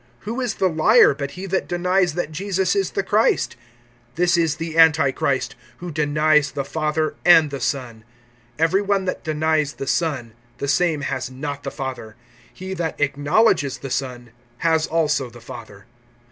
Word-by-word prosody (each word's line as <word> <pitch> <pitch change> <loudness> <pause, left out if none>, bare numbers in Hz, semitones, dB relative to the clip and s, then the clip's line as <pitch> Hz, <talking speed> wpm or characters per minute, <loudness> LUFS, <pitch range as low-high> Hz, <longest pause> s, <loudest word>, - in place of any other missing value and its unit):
(22)Who 235 +5 -3
is 240 -3 -1
the 190 - +1
liar, 180 +5 +5
but 140 0 -5
he 190 - -5
that 190 0 -1
denies 180 -1 +1
that 175 -3 -3
Jesus 190 - -1
is 395 -1 0
the - - -2
Christ? 470 -5 +1 0.6
This 175 +1 +2
is 165 -3 +1
the 165 +1 -6
antichrist, 155 -4 +3 0.2
who 175 +3 -7
denies 150 -1 +2
the 140 - -3
Father 155 +1 -1
and 160 -4 +6
the 140 - -4
Son. 125 -7 -3 0.5
(23)Every 165 +5 +2
one 200 -1 0
that 185 - -3
denies 155 -1 0
the - - -6
Son, 135 -7 -1 0.2
the 140 - -4
same 155 +1 +1
has 135 -2 -3
not 140 +2 -6
the - - -4
Father; 130 -6 -6 0.4
he 190 +1 -7
that 165 -3 -4
acknowledges 145 - +2
the 135 - -8
Son 125 -3 -4 0.3
has 160 +1 +1
also 150 -5 0
the 120 - -14
Father. 110 -4 -11
155 Hz, 165 wpm, -21 LUFS, 140-175 Hz, 0.6 s, and